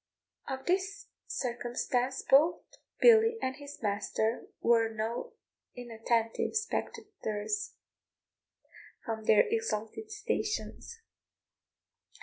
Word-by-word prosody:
Of 265 Hz, 0 st, -4 dB
this 390 Hz, +3 st, -1 dB, 0.2 s
circumstance 250 Hz, -, -1 dB
both 300 Hz, +6 st, +5 dB, 0.4 s
Billy 455 Hz, -1 st, +7 dB
and 260 Hz, -8 st, -2 dB
his 285 Hz, -3 st, -10 dB
master 215 Hz, +2 st, -1 dB
were 230 Hz, -1 st, +4 dB
no 225 Hz, +2 st, -3 dB, 0.4 s
inattentive 230 Hz, -, -1 dB
spectators 415 Hz, -, -3 dB, 1.3 s
from 220 Hz, -1 st, -4 dB
their 215 Hz, -1 st, +6 dB
exalted 435 Hz, -, -2 dB
stations. 430 Hz, +2 st, -3 dB
265 Hz, 80 wpm, -31 LUFS, -, 1.3 s, Billy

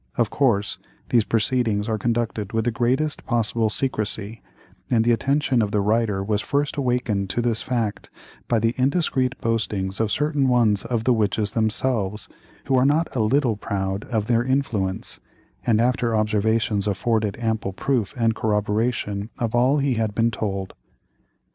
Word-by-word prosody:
Of 115 Hz, -3 st, +1 dB
course, 110 Hz, -8 st, +1 dB, 0.3 s
these 115 Hz, -3 st, +4 dB
proceedings 110 Hz, -2 st, 0 dB
are 110 Hz, -1 st, -1 dB
conducted 115 Hz, -2 st, -2 dB
with 110 Hz, 0 st, 0 dB
the 120 Hz, -, +2 dB
greatest 130 Hz, +6 st, 0 dB
possible 115 Hz, -2 st, +1 dB
secrecy, 110 Hz, -3 st, -2 dB, 0.5 s
and 115 Hz, -2 st, +3 dB
the 120 Hz, -, +4 dB
attention 135 Hz, +1 st, +1 dB
of 105 Hz, -, 0 dB
the 105 Hz, -, 0 dB
writer 105 Hz, -1 st, +1 dB
was 105 Hz, +1 st, 0 dB
first 145 Hz, +5 st, -1 dB
awakened 120 Hz, -7 st, 0 dB
to 105 Hz, -, -1 dB
this 115 Hz, -1 st, 0 dB
fact 115 Hz, -5 st, -2 dB, 0.4 s
by 120 Hz, -, +2 dB
the 115 Hz, +1 st, +1 dB
indiscreet 135 Hz, -2 st, +1 dB
boastings 105 Hz, -4 st, -1 dB
of 110 Hz, -1 st, 0 dB
certain 150 Hz, -3 st, +1 dB
ones 115 Hz, -5 st, +3 dB
of 115 Hz, -2 st, -1 dB
the 125 Hz, +1 st, +3 dB
witches 105 Hz, -2 st, 0 dB
themselves, 110 Hz, -2 st, -1 dB, 0.4 s
who 135 Hz, -, +1 dB
are 125 Hz, -, +4 dB
not 150 Hz, +3 st, +1 dB
a -, -, 0 dB
little 120 Hz, +1 st, +2 dB
proud 95 Hz, 0 st, -3 dB
of 110 Hz, -4 st, -1 dB
their 120 Hz, 0 st, +2 dB
influence, 120 Hz, -8 st, -1 dB, 0.5 s
and 110 Hz, -2 st, +4 dB
after 120 Hz, -1 st, +1 dB
observations 110 Hz, -1 st, +1 dB
afforded 105 Hz, 0 st, 0 dB
ample 110 Hz, -4 st, -1 dB
proof 115 Hz, +1 st, -1 dB
and 115 Hz, -1 st, +2 dB
corroboration 105 Hz, -1 st, -1 dB
of 115 Hz, -3 st, -2 dB
all 125 Hz, +4 st, +3 dB
he 140 Hz, -2 st, +1 dB
had 110 Hz, -3 st, -1 dB
been 115 Hz, 0 st, +2 dB
told. 100 Hz, -4 st, -3 dB
115 Hz, 160 wpm, -23 LUFS, 105-125 Hz, 0.5 s, these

